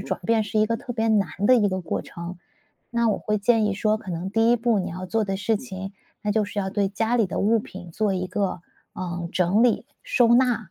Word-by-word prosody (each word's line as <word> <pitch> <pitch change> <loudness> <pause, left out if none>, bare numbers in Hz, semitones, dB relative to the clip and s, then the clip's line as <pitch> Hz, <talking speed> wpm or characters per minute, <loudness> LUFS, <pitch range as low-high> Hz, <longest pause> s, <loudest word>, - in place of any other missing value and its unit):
转 - - -3
变 225 -1 +2
是 210 +1 -2
一 215 - +5
个 230 +1 0
特 250 -2 -7
别 225 0 0
难 205 -4 +3
的 230 +5 +5
一 210 -4 +3
个 185 -1 -3
过 165 - -2
程。 170 +1 -8 0.5
那 235 -1 +1
我 - - -1
会 210 - -1
建 220 +1 +3
议 200 - 0
说， 215 +1 +1
可 205 -4 -8
能 175 +3 -4
第 225 +2 +3
一 240 - +5
步 230 -2 +1
你 185 - -2
要 185 +2 -6
做 220 +4 0
的 195 -2 -2
事 215 +2 0
情， 195 -4 -7 0.3
那 210 -1 0
就 215 0 +2
是 205 - -6
要 190 -1 -1
对 200 0 0
家 225 +4 -1
里 230 -4 +3
的 180 - -3
物 225 +3 +3
品 185 -5 -9
做 205 +2 0
一 185 0 -2
个， 185 -2 -2 0.3
呃， 175 -2 -4
整 185 +5 +2
理、 245 -2 +3 0.2
收 255 - +3
纳 240 -6 +2
210 Hz, 270 characters per minute, -24 LUFS, 190-225 Hz, 0.5 s, 一